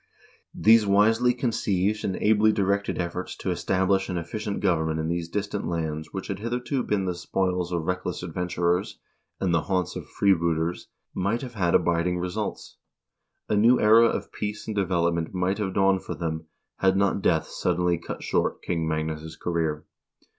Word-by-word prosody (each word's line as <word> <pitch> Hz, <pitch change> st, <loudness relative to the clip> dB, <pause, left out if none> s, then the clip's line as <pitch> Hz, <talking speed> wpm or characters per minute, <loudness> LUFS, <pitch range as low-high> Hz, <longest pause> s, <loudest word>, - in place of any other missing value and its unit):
These 110 Hz, -1 st, +5 dB
wisely 110 Hz, +5 st, +4 dB
conceived 110 Hz, -4 st, 0 dB
and 95 Hz, -, -1 dB
ably 110 Hz, 0 st, +4 dB
directed 100 Hz, -1 st, 0 dB
efforts 85 Hz, -1 st, -4 dB
to -, -, -2 dB
establish 95 Hz, +1 st, +1 dB
an 90 Hz, -, -2 dB
efficient 100 Hz, +5 st, -4 dB
government 80 Hz, -4 st, +1 dB
in 80 Hz, +1 st, -2 dB
these 85 Hz, -1 st, -2 dB
distant 100 Hz, +2 st, -3 dB
islands 80 Hz, -2 st, -3 dB
which 95 Hz, -, -5 dB
had 95 Hz, -1 st, -4 dB
hitherto 125 Hz, +4 st, -2 dB
been 105 Hz, -5 st, -1 dB
the 90 Hz, -, -1 dB
spoils 90 Hz, 0 st, -1 dB
of 85 Hz, -2 st, -1 dB
reckless 90 Hz, +1 st, -3 dB
adventurers, 90 Hz, +2 st, -1 dB, 0.4 s
and 90 Hz, -3 st, 0 dB
the 85 Hz, -, +3 dB
haunts 95 Hz, -2 st, -1 dB
of -, -, -6 dB
freebooters, 85 Hz, -3 st, +1 dB, 0.3 s
might 105 Hz, +7 st, -1 dB
have 125 Hz, -2 st, -7 dB
had 90 Hz, -6 st, +1 dB
abiding 85 Hz, +1 st, +2 dB
results; 90 Hz, 0 st, -4 dB, 0.7 s
a 105 Hz, -, +1 dB
new 115 Hz, +4 st, +5 dB
era 110 Hz, +2 st, +6 dB
of -, -, -3 dB
peace 105 Hz, 0 st, -4 dB
and 110 Hz, -, -4 dB
development 85 Hz, -3 st, 0 dB
might 95 Hz, +3 st, 0 dB
have 95 Hz, -3 st, -2 dB
dawned 95 Hz, -1 st, +3 dB
for -, -, -5 dB
them, 80 Hz, -1 st, -4 dB, 0.3 s
had 95 Hz, 0 st, +3 dB
not 100 Hz, 0 st, +1 dB
death 80 Hz, -3 st, +2 dB
suddenly 90 Hz, -1 st, 0 dB
cut -, -, -7 dB
short -, -, 0 dB
King 85 Hz, -2 st, -1 dB
Magnus' 80 Hz, 0 st, -3 dB
career. 80 Hz, -3 st, -2 dB
90 Hz, 165 wpm, -26 LUFS, 85-105 Hz, 0.7 s, era